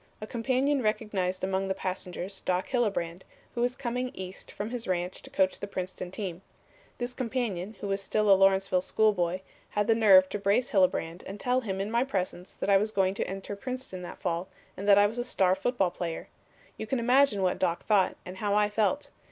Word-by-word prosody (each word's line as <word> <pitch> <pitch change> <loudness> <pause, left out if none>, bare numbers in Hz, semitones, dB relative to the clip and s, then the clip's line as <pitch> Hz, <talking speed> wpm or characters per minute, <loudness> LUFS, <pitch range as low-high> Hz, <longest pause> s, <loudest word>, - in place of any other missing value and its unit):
A 215 - -5
companion 260 +5 +1
recognized 205 -5 -1
among 190 0 0
the 190 - -1
passengers 185 0 -4
Doc 180 0 -1
Hillebrand, 195 -8 0 0.3
who 240 - -2
was 245 +1 +1
coming 250 -1 -2
East 185 0 -8
from 210 +3 -5
his 245 -2 -4
ranch 180 0 -2
to - - -12
coach 190 -1 +1
the 200 - -5
Princeton 185 -2 -5
team. 185 -2 -5 0.6
This 245 0 -3
companion 225 -6 -3
who 205 - -3
was 195 0 -1
still 210 +1 +2
a - - +11
Lawrenceville 195 -1 +4
schoolboy, 185 -3 +1 0.3
had 205 0 0
the 225 - +4
nerve 195 -4 +7
to 205 - -3
brace 205 +5 +2
Hillebrand 180 -3 +1
and 195 +2 -7
tell 250 +3 +1
him 195 -5 -3
in 200 +2 -2
my 235 +2 +3
presence 185 -7 -3
that - - -4
I 195 - +7
was 210 +3 +1
going 190 -3 +1
to - - -2
enter 195 +2 -5
Princeton 250 -4 -5
that 175 - -8
fall 175 -1 -2 0.3
and 200 - -6
that 200 - +8
I 205 - +7
was 220 +4 -2
a - - 0
star 190 -7 +2
football 195 -1 0
player. 170 -2 -5 0.5
You 220 - -5
can 265 - 0
imagine 245 -3 +3
what 180 - +1
Doc 175 -2 0
thought, 200 -4 +3
and 180 +1 -8
how 205 0 0
I 210 0 +3
felt. 220 +7 0
200 Hz, 210 wpm, -29 LUFS, 185-230 Hz, 0.6 s, a